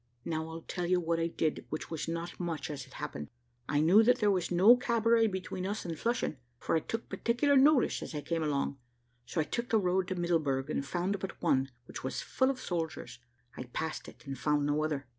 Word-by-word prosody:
Now 160 -1 -2
I'll 165 0 -7
tell 175 -2 -3
you 180 0 +3
what 165 -1 0
I 165 - +1
did, 160 -2 -1
which 155 - -5
was 160 0 -3
not 170 +1 -4
much, 165 -4 -3
as 140 -3 -6
it - - -17
happened. 75 0 -6 0.4
I 145 0 +2
knew 180 +8 +7
that 245 +2 +4
there 210 -4 +3
was 185 -3 0
no 190 +7 +7
cabaret 230 -2 +3
between 185 -1 -4
us 205 0 -3
and 165 -2 -3
Flushing, 235 - -1 0.2
for - - -1
I - - +4
took 225 +8 -4
particular 245 +5 +1
notice 275 -1 +5
as - - -6
I 150 - -2
came 165 +3 -2
along: 140 -2 -1 0.5
so - - -2
I - - +4
took 235 +9 -3
the 225 - +4
road 185 -2 +1
to 185 - -2
Middleburg, 155 -6 0
and 140 - -1
found 180 +7 -1
but 195 - -6
one, 135 0 +2 0.2
which - - -8
was 130 - -2
full 260 0 +1
of 270 -2 -2
soldiers. 165 - -4 0.4
I 125 - -6
passed 155 +6 -4
it, - - -14
and 135 -1 -4
found 150 0 +1
no 145 +1 +1
other. 150 -3 -2
170 Hz, 225 wpm, -31 LUFS, 150-205 Hz, 0.5 s, knew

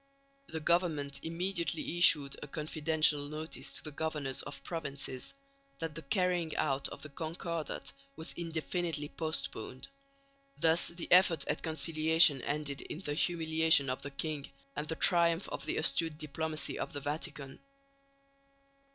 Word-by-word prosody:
The 160 - -5
government 155 -4 0
immediately 170 -1 -2
issued 145 -5 +7
a 150 - -6
confidential 155 -1 +1
notice 155 +1 -2
to - - -1
the 155 - -6
governors 150 -3 -2
of - - -9
provinces, 140 - -4 0.4
that 165 -1 -4
the 165 - -7
carrying 175 0 0
out 140 -1 +1
of - - -10
the 150 - -7
Concordat 165 +1 -4 0.2
was 160 +1 -1
indefinitely 165 -2 -3
postponed. 130 - -4 0.7
Thus 165 +1 +4
the 170 0 -5
effort 180 -2 +6
at 150 - -1
conciliation 160 -2 +4
ended 145 -1 -2
in 160 - -7
the 145 -6 -3
humiliation 160 -4 +3
of 130 - -4
the 140 - -6
king, 145 0 -3 0.3
and 150 - -3
the 160 - -2
triumph 170 +1 +3
of - - -6
the - - -1
astute 160 0 +2
diplomacy 155 +1 -3
of - - -4
the 145 - -3
Vatican. 145 -2 -4
160 Hz, 140 wpm, -32 LUFS, 145-165 Hz, 0.7 s, issued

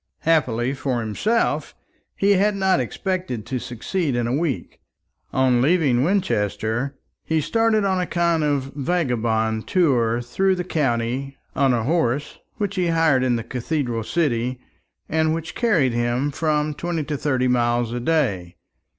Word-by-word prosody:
Happily 130 -6 +1
for 130 -2 -2
himself, 200 - 0 0.4
he 200 +1 +2
had 200 +1 +3
not 190 -5 +2
expected 130 - -3
to 130 -2 -3
succeed 125 - -2
in 120 -1 0
a 120 - -1
week. 150 -2 -2 0.5
On 130 -2 +3
leaving 140 -5 +3
Winchester, 135 - 0 0.3
he 160 0 0
started 225 +5 +2
on 190 -2 +1
a 180 - -2
kind 170 -2 +1
of 140 -2 -1
vagabond 120 -8 0
tour 120 -10 +2
through 190 +11 +1
the 180 - -3
county, 135 -3 -1 0.2
on 135 -1 +3
a 120 -2 +1
horse 145 -1 0 0.2
which 205 -2 -2
he 180 -1 +1
hired 165 -6 +3
in 125 -2 +2
the 115 - -3
cathedral 125 -2 -2
city, 125 -4 -1 0.5
and 160 0 +1
which 165 +1 -5
carried 170 - +2
him 120 +4 0
from 150 0 0
twenty 170 0 -3
to 150 +1 -3
thirty 130 -3 0
miles 120 -1 +1
a 120 - -2
day. 115 - 0
140 Hz, 150 wpm, -22 LUFS, 120-170 Hz, 0.5 s, had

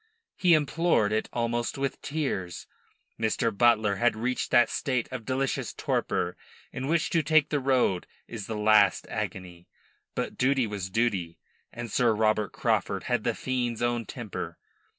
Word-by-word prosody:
He 175 -3 +5
implored 155 -7 +2
it 110 0 -1
almost 120 +1 -1
with 135 0 -3
tears. 130 - -3 0.5
Mr. 115 0 0
Butler 110 -3 +3
had 120 +2 +2
reached 125 +3 -2
that 120 -3 +4
state 130 -4 -1
of 125 -4 -6
delicious 135 +1 -1
torpor 90 - -1 0.4
in 130 +1 -4
which 165 +1 +1
to 165 - +3
take 155 0 +3
the 145 - +1
road 130 -9 +1 0.2
is 110 -4 -7
the 110 - -3
last 105 -2 +4
agony; 90 -2 -5 0.5
but - - -3
duty 135 -1 +3
was 100 -3 -4
duty, 95 -6 -1 0.3
and 120 -2 -7
Sir 115 -1 +3
Robert 110 -2 +1
Craufurd - - 0
had - - 0
the - - 0
fiend's 120 -3 -2
own 120 -1 0
temper. 120 -6 -6
120 Hz, 150 wpm, -27 LUFS, 105-130 Hz, 0.5 s, He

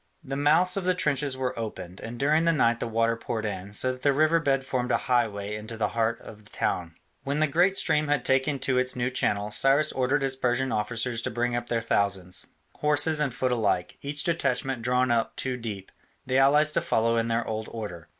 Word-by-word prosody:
The 135 -2 -5
mouths 160 +6 +3
of 195 - -1
the 185 0 +1
trenches 145 -5 0
were 130 -1 -2
opened, 105 -4 -6
and 115 +2 -7
during 150 +5 +2
the 165 - +4
night 120 -7 +2
the - - -3
water 115 0 +1
poured 115 -1 -4
in, 100 -1 -5
so 130 +5 0
that 130 0 -9
the 140 +1 +3
river 155 +3 +3
bed 135 -3 0
formed 125 -2 -2
a - - +4
highway 110 -5 -1
into 110 +2 -7
the 110 - 0
heart 115 0 0
of 105 0 -12
the 105 - -17
town. 85 -2 -2 0.3
When 140 +2 -2
the 155 - +4
great 175 +6 +2
stream 150 0 +1
had 145 -4 0
taken 135 +2 +2
to 130 -1 +2
its 130 0 0
new 125 +1 -1
channel, 105 -4 0
Cyrus 140 +6 +3
ordered 135 +2 0
his 135 -1 +1
Persian 130 0 0
officers 115 +2 -1
to - - -2
bring 120 +1 -1
up 120 0 -4
their 115 -1 0
thousands, 100 -4 -1 0.3
horse 150 -1 +2
and 150 -3 +1
foot 125 +2 -1
alike, 105 -7 0
each 145 +1 -3
detachment 135 -6 -1
drawn 125 +1 +1
up 115 -1 0
two 130 -1 -2
deep, 105 -6 -7 0.3
the 130 +1 +2
allies 150 +3 +4
to - - 0
follow 115 +1 +1
in 115 0 +1
their 115 0 0
old 110 0 -4
order. 95 -8 -7
125 Hz, 220 wpm, -26 LUFS, 115-140 Hz, 0.3 s, the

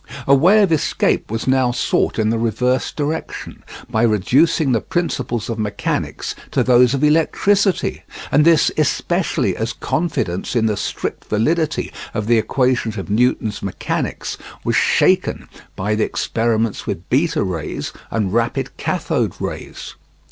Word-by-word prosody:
A 140 - +4
way 185 +10 +5
of 190 - +1
escape 160 - +1
was 115 +1 -3
now 130 -1 +3
sought 120 - 0
in 110 -1 +1
the 115 - 0
reverse 125 +2 0
direction, 155 +2 -4 0.2
by 110 - 0
reducing 130 - +3
the 115 - +2
principles 125 -9 -2
of 115 -1 -4
mechanics 105 -2 -2 0.2
to - - +1
those 125 +1 +4
of 135 - -2
electricity, 190 +6 +2 0.3
and 150 - +5
this 165 -2 +4
especially - - 0
as - - -3
confidence 125 - -2
in 115 -2 +2
the 110 -1 +1
strict - - -4
validity 155 +9 0 0.2
of 105 -2 -1
the 115 0 +4
equations 125 -2 0
of 95 +1 -5
Newton's 110 -1 +1
mechanics 100 -2 -3 0.2
was - - 0
shaken - - +2 0.3
by 105 +3 -1
the 105 0 +1
experiments 115 -1 -1
with 85 - -4
beta 150 +2 +2
rays 85 -5 -4 0.2
and 105 -4 -1
rapid 115 0 -1
kathode - - -1
rays. - - -6
120 Hz, 140 wpm, -19 LUFS, 110-150 Hz, 0.3 s, way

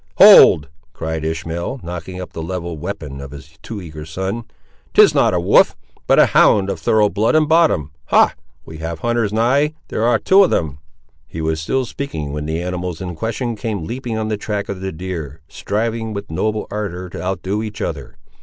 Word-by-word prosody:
"Hold!" 75 -2 +8 0.3
cried 80 -1 -4
Ishmael, 80 +9 -3
knocking 90 +1 -6
up 90 - -8
the 80 - -5
levelled 85 -2 -5
weapon 75 -7 -6
of 70 - -8
his 75 +2 -13
too 110 -3 -7
eager 75 -2 -8
son. 95 +8 -4 0.5
"'Tis - - +7
not - - +3
a - - +2
wolf; - - +4 0.3
but - - +4
a - - +7
hound 100 -1 +4
of - - -5
thorough 110 -1 +3
blood 110 +7 +1
and 155 -1 +4
bottom. 155 - +3
Ha! - - +4 0.3
we 80 -1 -10
have 80 0 -5
hunters 120 -3 0
nigh: 135 +8 +2
there - - -3
ar' 120 0 +4
two 195 - +5
of 180 - +2
them!" 75 -3 -1 0.5
He 80 - -8
was 80 0 -1
still 130 +11 -1
speaking, 80 - -5
when 75 +1 -4
the 80 +2 -2
animals 90 -2 -4
in 90 -2 -5
question 115 +6 -3
came 105 -6 -4
leaping 120 +1 -4
on 110 0 -2
the 110 -1 -2
track 105 -1 -4
of 95 -2 -5
the 95 0 -3
deer, 80 -4 -6
striving 110 +3 -3
with 100 -3 -6
noble 110 +6 -1
ardour 95 -4 -4
to - - -7
outdo 95 +3 -2
each 105 -1 -6
other. - - -5
95 Hz, 195 wpm, -19 LUFS, 80-110 Hz, 0.5 s, Hold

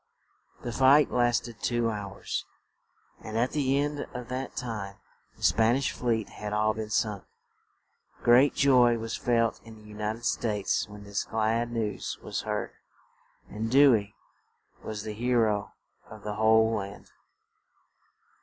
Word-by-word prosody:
The 120 - -3
fight 135 +4 +5
last 120 0 +2
ed 115 -2 -12
two 120 -1 0
hours; 100 -2 -4 0.8
and 110 0 -6
at 120 +3 +1
the 140 -2 +1
end 145 +1 -1
of 125 -1 -6
that 130 +1 -4
time 105 -6 -5 0.4
the - - -14
Span 115 +1 +4
ish 135 0 0
fleet 115 -4 -1
had 105 0 -6
all 110 +1 +2
been 110 0 -5
sunk. 105 -1 -1 1.0
Great 125 +4 +5
joy 125 -4 +5
was 115 0 -4
felt 115 -2 +1
in 115 -1 -12
the 110 - -16
U 105 0 -13
nit 105 +1 -2
ed 120 +1 -10
States 105 -3 0
when 105 0 -11
this 100 0 -2
glad 115 +2 0
news 110 -4 -3
was - - -4
heard, - - -3 0.8
and 110 +2 -4
Dew 135 +1 +7
ey 100 -2 -1 0.7
was 105 -2 -5
the 110 -1 -5
he 120 +3 0
ro 105 -3 +2 0.4
of 110 -1 -12
the 105 - -3
whole 110 +1 +4
land. 100 -2 -6
110 Hz, 155 wpm, -28 LUFS, 105-120 Hz, 1.0 s, Dew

